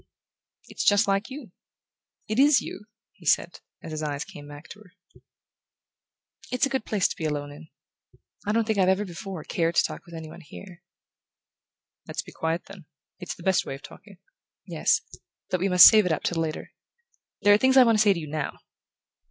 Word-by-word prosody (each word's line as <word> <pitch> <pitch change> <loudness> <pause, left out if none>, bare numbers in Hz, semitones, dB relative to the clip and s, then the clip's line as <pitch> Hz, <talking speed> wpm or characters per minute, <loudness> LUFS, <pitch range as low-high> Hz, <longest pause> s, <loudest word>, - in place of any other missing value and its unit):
"It's - - -5
just 205 -1 +4
like 195 +3 0
you 260 - -9 0.8
it 215 +3 -2
is 285 0 +6
you," 210 - -9 0.3
he - - -22
said, - - +1 0.2
as - - -8
his 155 0 -4
eyes 145 -1 -3
came 145 -6 -12
back 145 +1 -12
to 210 - -11
her. 200 -3 -19 1.6
"It's 250 +1 +1
a - - -3
good 265 -4 -2
place 205 -4 +1
to - - -5
be 160 - -5
alone 145 -1 -3
in 155 +2 -13 0.8
I - - +1
don't 225 +1 +1
think 215 -2 -1
I've 185 -1 +4
ever 190 +2 +1
before 180 -1 -8
cared 165 0 -1
to - - +4
talk - - -6
with 170 - -11
any 160 -1 -8
one 165 +3 -12
here." 175 +3 -13 1.3
"Let's - - -4
be - - -13
quiet, 165 +2 -3
then: 190 -6 -14 0.3
it's 180 - -6
the 170 - -14
best 190 0 +2
way - - -6
of 135 - -14
talking." 200 -3 -14 0.5
"Yes; - - +1 0.5
but 185 - 0
we 195 +3 0
must 180 -1 +9
save 215 -4 +5
it - - -1
up 155 - -2
till 165 -2 -1
later. 155 -1 -5 0.7
There 205 - +6
are - - +6
things 260 +2 +3
I 260 - +9
want 230 -3 +3
to - - +5
say 205 -2 +5
to 175 - -5
you 155 - -6
now." 150 0 -4
185 Hz, 205 wpm, -25 LUFS, 160-210 Hz, 1.6 s, must